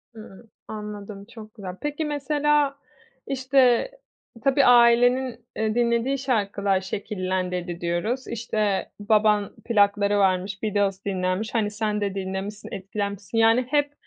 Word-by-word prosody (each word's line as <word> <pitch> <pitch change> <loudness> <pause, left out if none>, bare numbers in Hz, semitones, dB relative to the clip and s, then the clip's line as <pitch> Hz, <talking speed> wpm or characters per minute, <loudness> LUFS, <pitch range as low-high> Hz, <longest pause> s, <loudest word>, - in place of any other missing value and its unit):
Hımm, 220 0 -13 0.2
anladım. 210 -1 -7
Çok 220 -1 -12
güzel. 190 -4 -7
Peki, 295 +2 -2
mesela, 295 -1 +1 0.5
işte, 265 - +2 0.5
tabii 275 0 +4
ailenin, 245 0 +4
eee, 220 0 -1
dinlediği 240 +3 +1
şarkılar 200 -7 0
şekillendirdi 185 -3 -3
diyoruz. 190 +10 -2
İşte, 215 -3 -1
baban 210 -1 +2
plakları 205 -2 +2
varmış, 190 +1 0
Beatles 200 -2 0
dinlenmiş. 185 +2 -2
Hani, 210 -2 +1
sen 210 0 -2
de 200 -1 -2
dinlemişsin, 195 +2 -5
etkilenmişsin. 200 +1 -4
Yani, 225 +2 +5
hep 290 0 +1
210 Hz, 115 wpm, -24 LUFS, 195-245 Hz, 0.5 s, Yani